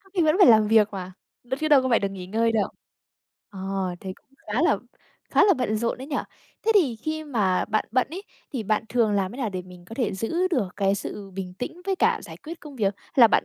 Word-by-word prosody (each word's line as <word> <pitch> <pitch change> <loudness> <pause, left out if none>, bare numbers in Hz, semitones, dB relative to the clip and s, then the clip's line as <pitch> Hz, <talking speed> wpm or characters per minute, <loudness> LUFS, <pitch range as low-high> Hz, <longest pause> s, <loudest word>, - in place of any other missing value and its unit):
có 385 - -22
khi 355 - +3
vẫn 310 +1 +3
phải 395 - +8
làm 215 -2 +5
việc 220 -1 +5
mà, 185 -1 -6 0.3
đ 245 - -19
chứ 310 - +1
đâu 290 -3 +6
có 260 - 0
phải 235 - +4
được 200 - -1
nghỉ 185 -2 -7
ngơi 225 +3 +1
đâu. 215 -3 +1 0.8
Ờ, 195 -3 -9 0.4
thế 190 -1 -5
cũng - - -28 0.2
khá - - 0
là - - +4 0.5
khá - - +5
là 395 -2 +5
bận 245 -6 -1
rộn 230 +2 -1
đấy 265 - -7
nhỉ? 290 - -2 0.5
Thế 450 - +5
thì 295 - +4
khi 310 +7 -4
mà 210 -10 +1
bạn 215 0 0
bận 250 +3 +2
ấy, 365 +5 -6 0.3
thì 250 -5 -2
bạn 215 +1 0
thường 230 -4 +2
làm 195 -1 0
thế - - -9
nào 240 -5 -1
để 185 -1 -4
mình 180 -1 -14
có 225 - -10
thể 235 -5 0
giữ 335 - 0
được 250 - 0
cái 195 -1 +2
sự 200 0 -6
bình 185 -1 -6
tĩnh 290 +9 -5
với 390 -1 0
cả 450 +4 +2
giải - - -10
quyết 330 +2 -9
công 290 -3 -11
việc? 200 -3 +1
Hay - - -26
là 240 -4 +9
bạn, - - +3
225 Hz, 265 wpm, -25 LUFS, 200-300 Hz, 0.8 s, là